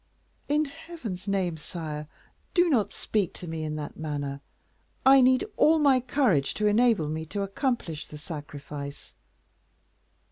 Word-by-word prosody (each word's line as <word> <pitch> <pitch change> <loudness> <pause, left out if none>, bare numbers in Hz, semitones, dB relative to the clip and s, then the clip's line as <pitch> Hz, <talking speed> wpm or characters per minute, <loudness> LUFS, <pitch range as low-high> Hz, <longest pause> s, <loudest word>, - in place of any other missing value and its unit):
"In 300 +1 +3
Heaven's 280 - -7
name, 185 -4 0
sire, 150 -2 -6 0.5
do 350 -2 +4
not 225 -7 +2
speak 205 -6 -1
to 175 - -7
me 160 -1 -4
in 155 0 -3
that 150 -1 -6
manner. 145 -3 -3 0.6
I 270 0 +8
need 255 +6 +4
all 320 +1 +6
my 280 -4 +5
courage 245 - +1
to 215 - 0
enable 210 -5 +4
me 155 +1 -3
to 200 +4 -2
accomplish 195 - -2
the 150 - -9
sacrifice." 145 -2 -8
190 Hz, 140 wpm, -27 LUFS, -, 0.6 s, I